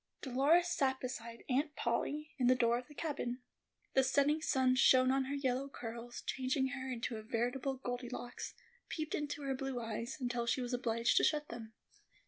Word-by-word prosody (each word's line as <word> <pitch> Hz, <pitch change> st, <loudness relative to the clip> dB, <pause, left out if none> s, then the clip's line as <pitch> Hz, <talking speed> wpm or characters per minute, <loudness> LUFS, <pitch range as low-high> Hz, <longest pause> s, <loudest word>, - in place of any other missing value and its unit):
Dolores 285 Hz, +7 st, +4 dB
sat 265 Hz, -4 st, +1 dB
beside 235 Hz, -2 st, -6 dB
Aunt 290 Hz, +3 st, +1 dB
Polly, 295 Hz, +6 st, -1 dB
in 250 Hz, -, +3 dB
the 255 Hz, -, +6 dB
door 235 Hz, -1 st, +3 dB
of 250 Hz, -, -11 dB
the 295 Hz, -, -14 dB
cabin. 265 Hz, -6 st, -3 dB, 0.5 s
The 265 Hz, -, +5 dB
setting 285 Hz, +4 st, +3 dB
sun 260 Hz, -4 st, +3 dB
shone 255 Hz, 0 st, +6 dB
on 270 Hz, 0 st, +2 dB
her 280 Hz, +2 st, -2 dB
yellow 270 Hz, 0 st, 0 dB
curls, 235 Hz, -1 st, -7 dB
changing 265 Hz, 0 st, 0 dB
her 265 Hz, -1 st, -4 dB
into 235 Hz, -1 st, -3 dB
a -, -, -6 dB
veritable 245 Hz, +4 st, -1 dB
"Goldilocks," 245 Hz, -1 st, -5 dB, 0.3 s
peeped 310 Hz, -1 st, -3 dB
into 295 Hz, -1 st, -2 dB
her 270 Hz, -1 st, 0 dB
blue 265 Hz, -1 st, -3 dB
eyes, 230 Hz, +4 st, -4 dB
until 245 Hz, -2 st, -1 dB
she 235 Hz, -, +2 dB
was 250 Hz, 0 st, -3 dB
obliged 230 Hz, -1 st, +2 dB
to -, -, +6 dB
shut 300 Hz, -1 st, +2 dB
them. 225 Hz, -1 st, -8 dB
255 Hz, 180 wpm, -35 LUFS, 240-275 Hz, 0.5 s, the